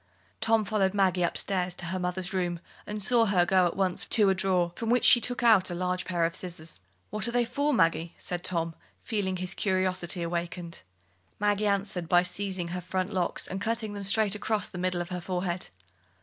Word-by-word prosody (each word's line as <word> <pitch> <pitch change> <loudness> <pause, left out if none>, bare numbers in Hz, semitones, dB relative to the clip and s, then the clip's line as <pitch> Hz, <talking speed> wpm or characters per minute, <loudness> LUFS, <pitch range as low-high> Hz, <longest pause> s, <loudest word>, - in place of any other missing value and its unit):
Tom 225 -1 +3
followed 200 -2 0
Maggie 185 -2 +2
upstairs 180 +1 0
into 175 - -7
her 185 +3 -3
mother's 180 +1 -3
room, 175 -2 -1 0.3
and 210 -1 -2
saw 235 +2 +4
her 180 -3 +3
go 185 0 +4
at 170 - -4
once 190 -2 0
to 210 -4 +3
a - - +4
drawer 180 -2 +1
from 225 +3 -3
which 245 +1 +3
she 240 - +8
took 245 +1 -1
out 215 -6 +5
a 175 - -4
large 180 +1 -2
pair 175 -2 0
of 165 +1 -2
scissors. 170 - -6 0.3
"What 215 +2 0
are - - -2
they 240 0 +2
for, 285 +5 0
Maggie?" 165 - +1
said 175 -1 -4
Tom, 165 -2 0 0.3
feeling 195 -4 -1
his 185 +1 -4
curiosity 185 -3 0
awakened. 170 - -4 0.6
Maggie 205 0 +1
answered 195 -4 -1
by 175 0 +5
seizing 180 -1 -2
her 180 +1 -4
front 185 +3 -3
locks 180 -2 0
and 190 +2 -5
cutting 220 -1 -2
them 205 - -6
straight 200 +1 +3
across 210 -1 -1
the 180 - -8
middle 180 -1 -1
of 175 - -6
her 180 -1 -4
forehead. 180 0 -3
185 Hz, 205 wpm, -28 LUFS, 175-205 Hz, 0.6 s, she